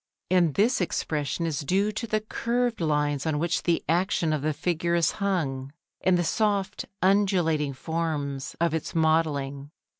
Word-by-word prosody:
And 175 -5 +3
this 225 +3 +3
expression 160 -1 -1
is 155 -3 -1
due 190 +8 +1
to 225 +2 -4
the 215 0 0
curved 235 +1 -1
lines 150 -2 0
on 155 -2 +1
which 170 +3 0
the 170 -1 +1
action 170 -1 +1
of 150 - -1
the 155 +2 0
figure 170 +2 -1
is 170 -2 +3
hung, 140 -9 -1 0.3
and 185 -1 +4
the 175 - +1
soft 200 +3 0 0.2
undulating 180 -7 +2
forms 145 -2 -3
of 170 -1 +1
its 160 - -3
modelling. 145 -4 +1
165 Hz, 155 wpm, -26 LUFS, 150-190 Hz, 0.3 s, and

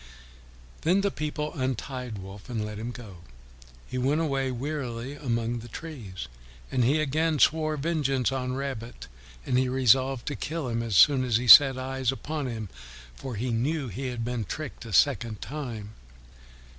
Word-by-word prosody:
Then 180 +5 +3
the 200 0 +1
people 150 -1 -3
untied 130 -4 -3
Wolf 95 +3 -10
and 110 -3 -2
let 105 0 -6
him 115 +2 -4
go. 115 -6 -9 0.7
He 130 - -4
went 140 +5 +2
away 135 -4 0
wearily 130 -1 -4
among 120 -4 -2
the 115 - -10
trees. 115 - -7 0.4
And 130 -2 +2
he 140 +6 +3
again 155 +2 +1
swore 155 0 +3
vengeance 140 -5 0
on 130 -1 -2
Rabbit, 130 -4 -5 0.4
and 125 - +2
he 130 -1 +1
resolved 130 0 +3
to 145 - -3
kill 155 -4 -3
him 115 0 -1
as 115 -4 -2
soon 135 +5 +6
as 120 -3 +2
he 125 +1 -3
set 135 +1 +10
eyes 130 -1 -1
upon 145 +1 -4
him, 110 -4 -5 0.4
for 125 - -7
he 120 +4 -2
knew 135 +4 -1
he 130 +7 -4
had 120 -2 -3
been 120 -2 -2
tricked 140 +3 -6
a 115 - -8
second 115 - +2
time. 120 -8 -6
130 Hz, 170 wpm, -27 LUFS, 115-145 Hz, 0.7 s, set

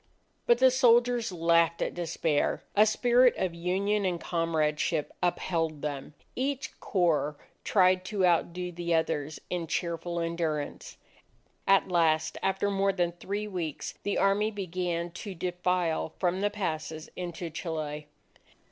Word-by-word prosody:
But 240 - +6
the 260 +1 +6
soldiers 240 -2 +4
laughed 170 -1 +3
at - - -1
despair; 165 -3 0
a 210 +1 +6
spirit 245 +3 +4
of 185 -2 -1
union 195 +5 0
and 180 -3 0
comradeship 160 -2 0
upheld 165 -3 -1
them. 145 0 -5 0.2
Each 270 +1 -3
corps 160 -6 +1 0.3
tried 185 -2 +3
to 195 -1 +1
outdo 180 +1 +1
the 170 -1 -1
others 155 -2 -1
in 175 -2 -2
cheerful 170 +1 -2
endurance. 165 -3 -3 0.7
At 195 0 +5
last, 160 -3 +2
after 195 +1 0
more 195 0 +2
than 175 -2 0
three 200 +4 -4
weeks, 175 -7 -4
the 205 - -1
Army 200 +2 +3
began 180 -4 -3
to 190 +2 -7
defile 180 -2 -1
from 185 +1 0
the 205 - +2
passes 160 -6 -4
into 175 -1 -5
Chile. 155 -2 -4
175 Hz, 130 wpm, -29 LUFS, 165-195 Hz, 0.7 s, But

